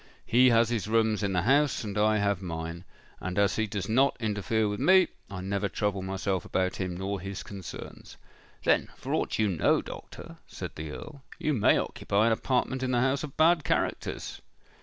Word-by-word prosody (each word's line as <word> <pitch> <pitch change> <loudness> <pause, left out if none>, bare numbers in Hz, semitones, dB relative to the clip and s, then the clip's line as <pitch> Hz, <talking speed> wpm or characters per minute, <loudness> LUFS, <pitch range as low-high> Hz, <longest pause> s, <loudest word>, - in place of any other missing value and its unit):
He 125 +2 +5
has 115 -1 +4
his 115 -3 -1
rooms 110 -1 +2
in 100 -1 0
the 90 -1 +1
house, 140 +4 +3
and 105 -2 -5
I 105 +1 +3
have 100 -2 0
mine; 85 0 -5 0.3
and 95 +1 -4
as 100 -2 +2
he 110 0 +1
does 100 -2 -4
not 130 +5 +3
interfere 110 0 0
with 105 0 -3
me, 185 0 +5 0.2
I 95 -2 -6
never 100 +1 -1
trouble 100 0 -1
myself 95 -1 -2
about 95 0 -1
him 90 -2 -3
nor 95 +1 -3
his 95 0 -6
concerns." 95 -3 -9 0.5
"Then, - - +2
for - - -5
aught - - 0
you 110 - +2
know, 90 -6 +2
doctor," - - -10
said - - -7
the 80 0 -6
Earl, 140 - -9 0.2
"you 155 - 0
may 115 - +4
occupy 100 +2 0
an 115 - +3
apartment 130 +3 0
in 130 - -1
the 125 -1 +2
house 135 +3 +1
of 145 -3 -8
bad 165 0 +4
characters?" - - -2
105 Hz, 195 wpm, -28 LUFS, 95-120 Hz, 0.5 s, He